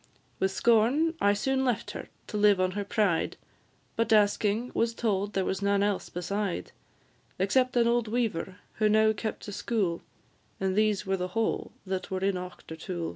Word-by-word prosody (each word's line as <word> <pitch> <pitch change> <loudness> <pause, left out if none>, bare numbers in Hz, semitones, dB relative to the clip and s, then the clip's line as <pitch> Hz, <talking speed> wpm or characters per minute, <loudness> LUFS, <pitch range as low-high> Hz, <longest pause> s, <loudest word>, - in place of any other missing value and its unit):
With 190 - +2
scorn 235 +10 +3
I 200 0 +4
soon 265 +6 0
left 245 -5 -1
her - - -8 0.2
to - - -8
live 205 -2 +4
on 185 0 +2
her 205 +2 -3
pride; 200 -5 0 0.6
But, 230 0 0
asking, 215 +2 +3
was 230 0 0
told 205 -3 -1
there 190 -1 0
was 190 - -2
none 200 0 +2
else 205 -2 -1
beside, 185 - -3 0.7
Except 250 +7 +2
an 235 -1 +4
old 235 -1 +2
weaver, 215 -6 -1 0.2
who 215 -1 +3
now 220 +1 +4
kept 215 +1 -5
a - - -5
school, 200 -4 -1 0.6
And 190 -1 0
these 210 -1 +2
were 190 0 0
the 180 0 -2
whole 225 - 0
that 190 -1 -3
were 185 -1 -3
in 195 +1 +2
Auchtertool. 180 -1 -6
205 Hz, 175 wpm, -28 LUFS, 190-225 Hz, 0.7 s, I